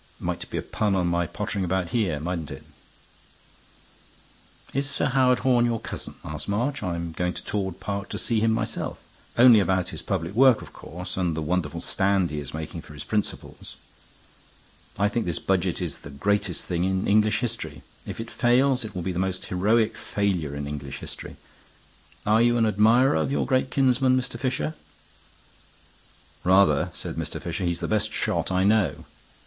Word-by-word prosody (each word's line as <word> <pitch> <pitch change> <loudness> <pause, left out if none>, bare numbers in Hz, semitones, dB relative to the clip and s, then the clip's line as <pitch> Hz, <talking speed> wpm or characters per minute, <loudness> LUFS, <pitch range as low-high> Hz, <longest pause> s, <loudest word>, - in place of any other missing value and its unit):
Might - - -3
be - - -3
a - - -2
pun 105 -2 0
on 90 -2 +1
my 85 0 +1
pottering 100 +1 -3
about 90 -1 0
here, 90 -8 0
mightn't 85 -1 -3
it?" - - -8 2.1
"Is 140 +1 0
Sir - - 0
Howard 130 -2 +4
Horne 120 -2 +4
your 115 -1 0
cousin?" - - -7
asked 75 +4 -6
March. 120 +6 0
"I'm 85 -3 -3
going 90 +2 -1
to - - -7
Torwood 95 -4 -3
Park 100 -1 -4
to 105 - -4
see 110 +1 0
him 110 +1 +3
myself; 110 - -2 0.4
only 120 -2 +8
about 95 -2 +1
his - - -6
public 85 +4 -2
work, 130 +1 +5
of - - -13
course, 90 +3 -7
and 85 -4 0
the - - -1
wonderful 80 -2 -1
stand 95 -3 +1
he 75 - -3
is 70 -2 -6
making 80 +2 -5
for 75 - -13
his 75 - -6
principles. 105 -1 -3 1.2
I 100 +2 +3
think 110 -1 -1
this 85 -1 0
Budget 95 -2 0
is 85 - -4
the - - -10
greatest 100 +5 -1
thing 85 -1 -1
in 95 0 0
English 110 +1 +4
history. 120 -2 -4 0.2
If - - -7
it 115 0 -6
fails, 125 +1 +3
it 105 -3 -8
will 90 - -3
be 95 - -1
the 90 - -3
most 95 0 -2
heroic 110 +5 +2
failure 90 -8 -1
in 70 0 -4
English 70 -1 -5
history. - - -8 0.9
Are 110 +2 +4
you 120 0 +4
an 115 - +3
admirer 110 +6 +4
of - - 0
your - - +1
great 130 -1 +1
kinsman, 130 -1 +3
Mr. 125 0 -5
Fisher?" 130 +4 -1 1.7
"Rather," 95 +2 +4
said - - -5
Mr. - - -3
Fisher. 95 - -3
"He's 85 -1 -1
the - - -1
best 110 0 0
shot - - -1
I 95 0 +2
know." 100 -6 +2
100 Hz, 180 wpm, -25 LUFS, 90-115 Hz, 2.1 s, only